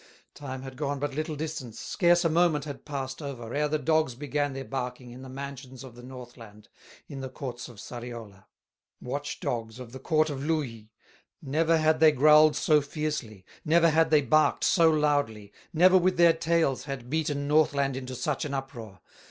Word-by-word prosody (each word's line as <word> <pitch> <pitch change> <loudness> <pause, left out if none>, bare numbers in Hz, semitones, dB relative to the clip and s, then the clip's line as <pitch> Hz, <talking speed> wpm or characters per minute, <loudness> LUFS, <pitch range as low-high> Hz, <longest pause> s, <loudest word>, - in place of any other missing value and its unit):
Time 130 -2 -7
had 130 -1 -9
gone 145 -1 -2
but 145 0 -3
little 155 +2 -3
distance, 140 -7 -6
Scarce 175 -1 +2
a - - +6
moment 160 -3 +2
had 145 -3 -8
passed 135 -1 -5
over, 125 -5 -7
Ere 150 +1 +1
the 155 +1 0
dogs 155 -3 +1
began 145 +1 -2
their 135 0 -6
barking, 125 -2 -5
In 125 +2 -11
the 130 - -10
mansions 135 -1 -8
of 130 -3 -11
the 120 - -13
Northland, 120 -4 -12 0.4
In 135 -1 -8
the 130 - -5
courts 125 -2 -7
of 120 - -14
Sariola, 115 -4 -9 0.5
Watch 145 +3 -5
dogs 115 -1 -4
of 125 -2 -9
the 130 - -9
court 155 +3 +1
of 135 -1 -5
Louhi; 130 -9 -3 0.5
Never 160 +2 +1
had 155 0 +2
they 160 -1 +7
growled 150 +2 +6
so 150 0 +3
fiercely, 140 -9 -5 0.2
Never 165 +1 +4
had 160 +1 +3
they 150 -2 +4
barked 155 +2 +2
so 165 -3 +4
loudly, 145 -10 0 0.2
Never 185 +3 +5
with 180 0 +1
their 170 -1 +6
tails 165 -5 0
had 135 -4 -6
beaten 145 -2 -1
Northland 145 -3 +2
into 130 -1 -6
such 135 +3 -2
an 140 -2 -3
uproar. 120 -8 -7
140 Hz, 185 wpm, -27 LUFS, 125-155 Hz, 0.5 s, they